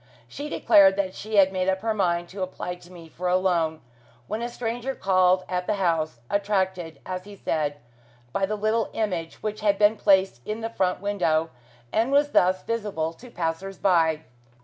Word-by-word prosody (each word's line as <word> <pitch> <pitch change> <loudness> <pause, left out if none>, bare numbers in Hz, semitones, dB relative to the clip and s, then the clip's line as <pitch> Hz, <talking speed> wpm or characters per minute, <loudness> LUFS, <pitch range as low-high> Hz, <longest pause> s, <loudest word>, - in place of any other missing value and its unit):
She 295 +1 -6
declared 195 -8 +5
that 190 -2 -1
she 215 +1 -5
had 195 -1 +5
made 185 0 0
up 190 0 0
her 225 0 0
mind 175 -4 0
to 195 +1 -7
apply 185 -1 -4
to 180 0 -15
me 170 -2 -12
for 175 +3 -5
a 180 - +3
loan, 170 -4 +1 0.4
when 215 - -4
a 240 - -2
stranger 245 +2 -3
called 185 -1 +3
at 180 -1 -2
the 210 - +1
house, 160 -8 0
attracted, 190 -4 -1
as 185 0 -5
he 205 0 -11
said, 150 -6 -2 0.6
by 195 -1 +1
the 215 - -2
little 215 +2 0
image, 180 -7 -3
which 215 0 -3
had 205 -1 +2
been 210 +2 +4
placed 190 - +3
in 215 +2 -4
the 225 0 -3
front 185 -4 0
window, 170 -6 0 0.4
and 230 +4 +2
was 290 +1 +3
thus 185 +1 +3
visible 205 -8 -2
to 245 +9 -14
passers 180 0 -3
by. 160 -4 +2
190 Hz, 190 wpm, -25 LUFS, 175-210 Hz, 0.6 s, declared